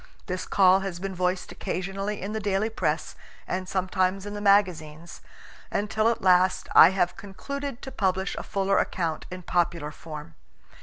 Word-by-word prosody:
This 185 -1 -4
call 190 -1 +5
has 195 -2 -4
been 195 +2 -5
voiced 180 0 -1
occasionally 195 +3 -4
in 205 +2 -4
the 220 - -2
daily 205 +1 0
press - - -2 0.3
and 185 0 -3
sometimes 185 0 0
in 205 - -6
the 205 - -5
magazines, 175 -5 +1 0.5
until 215 +2 +1
at 230 - -2
last 185 0 +3
I 165 - +9
have 180 -1 0
concluded 275 +8 -6
to 265 - -6
publish 190 -2 -1
a - - -4
fuller 195 0 0
account 165 -4 -2
in 185 0 -8
popular 170 -3 0
form. 150 - -9
190 Hz, 160 wpm, -26 LUFS, 180-200 Hz, 0.5 s, I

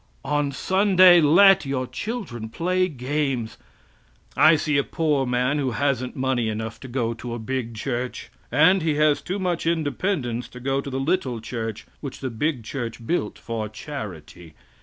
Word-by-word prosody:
On 145 0 0
Sunday 185 +2 +5
let 195 +5 +6
your 135 -2 -2
children 145 - -5
play 185 +8 0
games. 135 -5 -2 0.8
I 155 +2 +6
see 150 -1 +1
a - - +1
poor 150 -5 0
man 125 +4 +1
who 135 -2 0
hasn't 130 -3 0
money 130 -3 0
enough 110 +1 -4
to 130 - -9
go 120 -2 -1
to 120 +1 -6
a - - -4
big 120 0 -4
church, 125 +2 -4 0.2
and 160 +9 +5
he 155 -2 0
has 150 -1 +3
too 190 - -3
much 180 -4 -1
independence 145 - -1
to 125 - -11
go 135 +2 0
to 140 - -7
the 135 0 -3
little 135 -5 0
church 115 -1 -5
which 140 -3 -7
the 130 -2 -4
big 130 +2 -1
church 115 -1 -5
built 115 -8 -1
for 110 -2 -4
charity. 95 - -8
135 Hz, 165 wpm, -24 LUFS, 120-155 Hz, 0.8 s, let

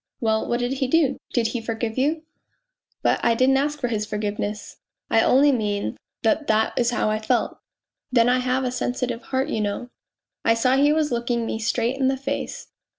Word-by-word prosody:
" - - -63
Well, 220 -1 0
what 240 - +1
did 245 +1 -1
he 265 -1 -1
do 275 -1 +2
did 230 -2 +1
he 240 0 -3
forgive 225 0 -3
you? 305 +5 0 0.3
" - - -50
" - - -48
But - - +2
I 235 -1 +3
didn't 260 +3 +4
ask 295 +2 -1
his 230 -4 -1
forgiveness... 210 0 -4 0.3
I 225 - +5
only 280 +5 +5
mean 210 -5 -1 0.3
that 285 +7 +1
that 220 0 +2
is 240 -1 +2
how 240 -3 0
I 215 - 0
felt. 220 - -1 0.5
Then 235 -2 +4
I 250 +1 +3
have 255 +1 0
a 250 - -1
sensitive 245 -1 -2
heart, 265 +3 -2
you 220 - -1
know. 210 +4 -3 0.5
I 230 - +4
saw 255 +3 +2
he 285 +2 +4
was 305 -2 +1
looking 235 -1 -1
me 220 - -3
straight 235 +3 0
in 265 - +2
the 265 0 +1
face. 275 +1 -4
245 Hz, 210 wpm, -23 LUFS, 225-265 Hz, 0.5 s, I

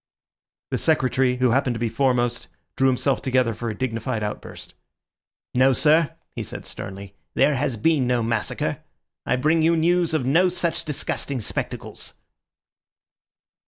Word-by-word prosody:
The - - 0
Secretary, 130 -4 +2
who 125 -1 +2
happened 130 -1 +1
to - - -4
be 120 - 0
foremost, 120 -1 0 0.3
drew 135 - +3
himself 130 +1 +1
together 130 -3 +1
for 115 +2 -4
a 105 - -5
dignified 115 -2 -2
outburst. 105 - -6 0.8
"No, 130 +1 +4
sir," 155 +4 +3 0.2
he - - -3
said - - -7
sternly 95 0 -7 0.2
"there 150 - +4
has 135 -3 -1
been 140 +2 +2
no 120 -2 +1
massacre. 115 -1 -1 0.5
I - - +3
bring 155 +6 +2
you 165 +1 +3
news 170 0 +2
of 140 -5 0
no 170 +8 +4
such 170 -2 -2
disgusting 140 -2 -3
spectacles." 105 - -5
130 Hz, 145 wpm, -23 LUFS, 120-150 Hz, 0.8 s, No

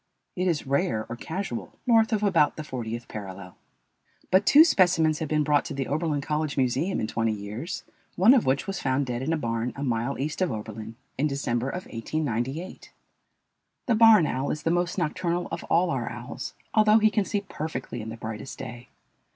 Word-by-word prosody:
It 185 +1 0
is 165 -5 0
rare 125 -5 0
or 120 - -4
casual 190 - -5
north 225 -1 +4
of 215 -2 +1
about 165 -8 +3
the 155 - -4
fortieth 120 -4 -5
parallel. 95 -3 -8 0.8
But 190 +2 +4
two 300 +3 +9
specimens 170 - +3
have 160 - -3
been 150 -1 +2
brought 145 -1 +3
to 145 - -5
the 135 -1 -2
Oberlin 150 0 -1
College 150 0 -2
Museum 135 +8 +1
in - - -1
twenty 110 0 0
years, 105 - -5 0.3
one 205 +8 +7
of 255 - +3
which 130 0 +1
was 195 -1 -4
found 135 +1 +1
dead 120 -1 -3
in 145 +5 -1
a 165 - +1
barn 115 -3 -2
a 140 - -5
mile 120 +1 -1
east 150 +7 -3
of 185 - +2
Oberlin 110 +1 -6 0.2
in 150 - +3
December 135 -3 -1
of 180 +6 -5
1898. 135 +5 -4 0.9
The 240 - +2
barn 220 -5 +7
owl 135 -1 -1
is 150 - -3
the 165 - +1
most 175 +1 0
nocturnal 175 +1 -1
of 165 - -4
all 175 +1 +2
our - - -2
owls, - - -7 0.2
although 215 0 +6
he 215 -1 +4
can 210 -2 +2
see 205 +1 -2
perfectly 150 - -5
in 110 - -6
the 115 - -7
brightest 110 +2 -6
day. 120 0 -8
150 Hz, 195 wpm, -26 LUFS, 120-180 Hz, 0.9 s, two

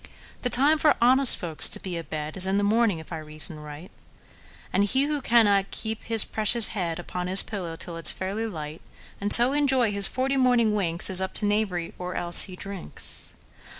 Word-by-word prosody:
The 245 - -3
time 290 +6 +4
for 300 - +2
honest 255 +2 +6
folks 165 -3 +3
to - - +1
be 185 -2 -7
a 165 - -6
bedIs 155 +5 -3
in 195 +1 -1
the 205 - -1
morning, 215 -2 0
if 160 +2 -11
I 160 - -6
reason 155 0 -2
right; 150 +3 -12 0.8
And 200 - +1
he 260 +6 -1
who 295 0 -3
cannot 205 -5 +1
keep 220 -1 -6
his 225 -2 +1
precious 220 +1 +4
headUpon 180 -1 -5
his 190 +2 +5
pillow 180 -6 -7
till 165 +1 -8
it 165 - -5
's - - +2
fairly 200 +4 -5
light, 155 -5 -9 0.4
And 205 +1 -3
so 245 +3 +4
enjoy 265 -6 0
his 200 -1 +7
forty 265 +2 -3
morning 245 -4 +1
winks, 175 -3 0
Is 190 0 +4
up 190 0 -5
to 210 - -2
knavery; 205 -5 -3
or 180 0 -7
else—he 175 +2 -1
drinks! 195 -1 -8
200 Hz, 195 wpm, -24 LUFS, 175-235 Hz, 0.8 s, his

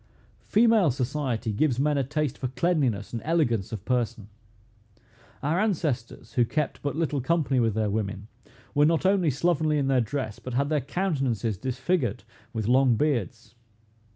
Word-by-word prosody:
Female 220 -5 +4
society 125 -3 -2
gives 130 +3 +1
men 150 +1 +2
a 140 - +1
taste 150 0 -2
for 130 - -1
cleanliness 130 - 0
and 115 - -3
elegance 135 - +1
of 105 -3 -6
person. 120 -4 -1 1.1
Our 155 +5 +1
ancestors, 155 - -2
who 125 - +3
kept 150 +5 -2
but 145 -1 -2
little 155 -4 -1
company 145 -2 +1
with 115 -3 +1
their 110 -2 0
women, 100 -1 -3 0.5
were 145 - +4
not 165 +2 +1
only 190 -4 +3
slovenly 155 +2 +1
in 135 -2 0
their 130 -2 +3
dress, 115 -2 -3
but 125 -1 -6
had 140 +2 +1
their 150 -2 +1
countenances 135 - -1
disfigured 130 - -1 0.3
with 110 -3 -3
long 130 0 +4
beards. 120 -4 -1
135 Hz, 155 wpm, -26 LUFS, 115-155 Hz, 1.1 s, Female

